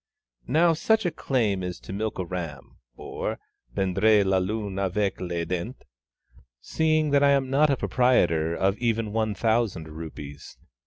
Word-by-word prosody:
Now 165 +6 +4
such 220 +6 +1
a 175 - +1
claim 110 -11 0
is 90 -1 -5
to - - -8
milk 110 +2 -3
a 95 - -2
ram, 85 -6 -7 0.2
or - - -5 0.4
prendre 100 +3 +3
la 95 -1 +2
lune 100 0 -3
avec 100 +1 -1
les 85 -2 -2
dents, 90 +9 -4 0.8
seeing 155 - +1
that 140 0 +4
I 140 - +5
am 135 -2 +2
not 150 +2 +4
a 140 - +2
proprietor 85 -13 +2
of 95 +3 0
even 115 -3 -1
one 110 -2 0
thousand 110 -6 0
rupees. 75 -3 -9
105 Hz, 155 wpm, -26 LUFS, 90-130 Hz, 0.8 s, I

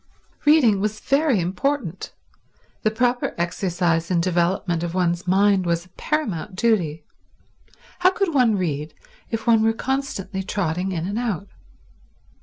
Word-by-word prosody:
Reading 275 -10 +5
was 210 +1 -2
very 275 -4 +2
important; 190 - -2 0.7
the 215 - +2
proper 245 +3 0
exercise 170 -1 0
and 180 -2 +2
development 175 0 0
of 170 0 -3
one's 175 0 0
mind 195 +1 +3
was 170 0 0
a - - -22
paramount 210 - -3
duty. 180 -8 +1 1.0
How 360 +1 +6
could 380 -2 -1
one 245 -6 +4
read 155 -4 -3 0.3
if 225 -1 -3
one 230 -2 +5
were 225 0 +3
constantly 225 -7 -3
trotting 185 -1 -2
in 170 -2 -2
and 200 +4 -2
out? 205 -6 -3
195 Hz, 135 wpm, -22 LUFS, 175-235 Hz, 1.0 s, How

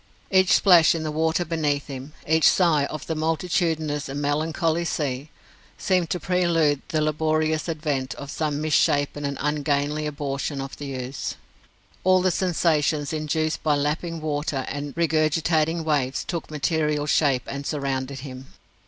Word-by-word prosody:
Each 185 -1 +5
splash 175 -4 +6
in 160 - -3
the 155 - -2
water 160 +2 0
beneath 150 -4 -1
him, 135 +1 -8
each 160 +1 +4
sigh 165 -6 +3
of 155 +1 -6
the 160 - -2
multitudinous 160 -2 -1
and 140 +1 -4
melancholy 155 +3 0
sea, 145 -4 -2 0.5
seemed 180 -3 +1
to 180 - -1
prelude 170 -6 +2
the 155 - 0
laborious 155 +1 0
advent 150 -5 -2
of 140 0 -8
some 150 -2 -2
mis 155 -1 -1
shapen 145 0 +2
and 140 -1 -3
ungainly 150 0 0
abortion 140 -1 -3
of 135 0 -5
the 140 -2 -5
ooze. 130 +1 -4 0.7
All 185 0 +4
the 185 - +3
sensations 155 -5 +1
induced 155 +1 -1
by 150 -2 +2
lapping 155 +3 -2
water 145 -3 -2
and 145 0 -5
regurgitating 160 0 +1
waves 140 -4 0
took 170 -3 -5
material 150 -1 0
shape 140 -3 +2
and 140 0 -5
surrounded 135 -2 -3
him. 130 -1 -9
155 Hz, 150 wpm, -24 LUFS, 145-160 Hz, 0.7 s, splash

